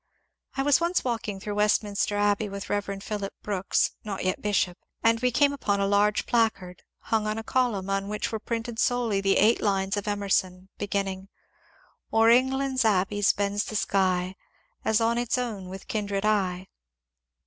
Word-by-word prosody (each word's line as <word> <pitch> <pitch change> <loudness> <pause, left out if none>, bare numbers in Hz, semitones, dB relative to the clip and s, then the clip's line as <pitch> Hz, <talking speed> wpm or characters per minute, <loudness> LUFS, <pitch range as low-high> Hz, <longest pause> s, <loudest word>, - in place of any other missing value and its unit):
I 270 - +1
was 290 +3 +4
once 345 +2 +1
walking 225 -5 -3
through 205 +2 -5
Westminster 205 0 +1
Abbey 205 +1 +1
with 200 0 -6
Rev. 200 -1 -2
Phillips 205 -2 -4
Brooks 195 -2 0
(not 200 -3 -4
yet 185 - -1
bishop) 195 -3 0 0.2
and 230 0 +4
we 250 +1 +2
came 285 +4 +3
upon 205 -7 -1
a 200 - +2
large 205 +1 +2
placard, 200 -6 0 0.3
hung 220 -1 +2
on 215 +1 -2
a 225 - -4
column, 230 -7 0
on 195 0 -1
which 210 +2 -3
were 220 - -3
printed 230 +1 -4
solely 235 -5 +1
the 195 0 +2
eight 220 +3 +4
lines 195 -1 0
of 205 - -4
Emerson 190 -2 -1
beginning, 195 -1 -3 0.4
— - - -34
O'er 225 +1 +5
England's 265 +1 +2
abbeys 205 -1 +2
bends 205 0 -1
the 215 - -6
skj, 185 -3 +1 0.5
As 220 +1 +2
on 230 +1 +2
its 240 +1 0
own 215 -7 -4
with 190 0 -9
kindred 205 -2 -2
eye. 190 -3 0
205 Hz, 170 wpm, -26 LUFS, 195-225 Hz, 0.5 s, O'er